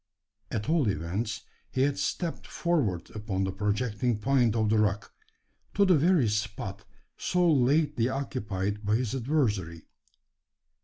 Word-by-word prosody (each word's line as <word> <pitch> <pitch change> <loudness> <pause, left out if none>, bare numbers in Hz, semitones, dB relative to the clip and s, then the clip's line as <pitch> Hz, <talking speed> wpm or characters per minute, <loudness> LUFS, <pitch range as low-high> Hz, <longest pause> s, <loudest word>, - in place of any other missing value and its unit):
At 105 - -3
all 155 -6 +2
events 95 +6 -2 0.3
he 130 - +1
had 140 0 0
stepped 170 -3 -2
forward 130 - -1
upon 105 -3 -3
the 95 - -1
projecting 105 +4 -1
point 120 -1 +2
of 110 -2 +1
the 110 - +4
rock 105 -1 0 0.6
to 200 - +5
the 185 - +5
very 160 -3 +3
spot 105 -2 -3 0.3
so 180 -1 +1
lately 140 -2 +2
occupied 105 -7 -3
by 105 +1 +2
his 120 0 -1
adversary. 110 - -1
110 Hz, 135 wpm, -28 LUFS, 105-140 Hz, 0.6 s, to